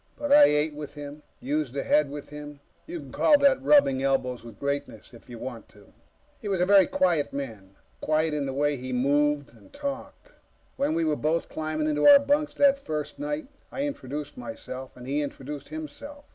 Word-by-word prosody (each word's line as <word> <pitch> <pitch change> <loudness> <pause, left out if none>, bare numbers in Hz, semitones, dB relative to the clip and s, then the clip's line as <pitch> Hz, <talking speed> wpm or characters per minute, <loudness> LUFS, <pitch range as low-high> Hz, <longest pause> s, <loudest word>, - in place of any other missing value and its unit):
But 290 -1 -3
I 290 0 +9
ate 150 - +1
with 150 0 -8
him, 145 0 -8 0.2
used 145 -1 -2
the 140 - -1
head 150 -2 +3
with 145 0 -8
him; 150 0 -9 0.3
you 340 +1 -5
can - - -11
call 295 - +5
that 280 -1 +4
rubbing 270 - +4
elbows 130 -3 0
with 115 -1 -12
greatness, 140 -5 -4
if 115 - -16
you 120 - -8
want 120 -2 -8
to. 100 -1 -20 0.5
He - - -7
was 195 -3 0
a 180 - +3
very 195 -1 +6
quiet 170 -6 +1
man. 110 -9 -7 0.2
Quiet 155 0 +1
in 145 -2 -1
the - - -2
way 145 +1 +1
he 130 +1 -6
moved 145 +1 +1
and 110 - -19
talked. 280 -1 -6 0.4
When 275 - 0
we 165 0 +1
were 155 -1 +1
both 160 +3 -1
climbing 155 -1 -2
into 150 -1 +2
our 285 -1 +11
bunks, 290 +2 0
that 280 -1 +4
first 155 - -5
night, 295 +1 -3 0.3
I 275 - -3
introduced 150 - -5
myself 125 +3 -8
and 125 - -10
he 140 +3 -1
introduced 145 0 -6
himself. 290 -2 -8
150 Hz, 200 wpm, -26 LUFS, -, 0.5 s, our